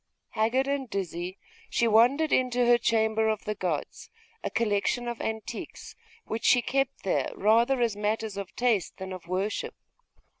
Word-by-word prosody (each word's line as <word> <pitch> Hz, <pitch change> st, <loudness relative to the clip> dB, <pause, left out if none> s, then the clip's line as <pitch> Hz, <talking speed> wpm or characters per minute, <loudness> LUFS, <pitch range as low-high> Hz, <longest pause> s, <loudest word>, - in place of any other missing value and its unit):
Haggard 230 Hz, +5 st, +1 dB
and 275 Hz, -2 st, -2 dB
dizzy, 180 Hz, -1 st, -4 dB, 0.3 s
she 235 Hz, -, +2 dB
wandered 250 Hz, +8 st, +4 dB
into 250 Hz, -1 st, +2 dB
her 240 Hz, 0 st, +5 dB
'chamber 220 Hz, -1 st, +2 dB
of 215 Hz, -1 st, -2 dB
the 210 Hz, -, -1 dB
gods'; 175 Hz, -7 st, -4 dB, 0.3 s
a -, -, -1 dB
collection 230 Hz, +2 st, 0 dB
of 235 Hz, -1 st, -4 dB
antiquities, 220 Hz, -1 st, -6 dB, 0.3 s
which 220 Hz, -, -4 dB
she 245 Hz, -, +5 dB
kept 270 Hz, +2 st, -1 dB
there 190 Hz, -, 0 dB
rather 235 Hz, +6 st, +3 dB
as 230 Hz, -3 st, +1 dB
matters 210 Hz, 0 st, -2 dB
of 200 Hz, -1 st, -7 dB
taste 235 Hz, -7 st, 0 dB
than 190 Hz, -1 st, -6 dB
of 180 Hz, -2 st, -9 dB
worship. 190 Hz, +4 st, -2 dB
220 Hz, 155 wpm, -28 LUFS, 200-240 Hz, 0.3 s, her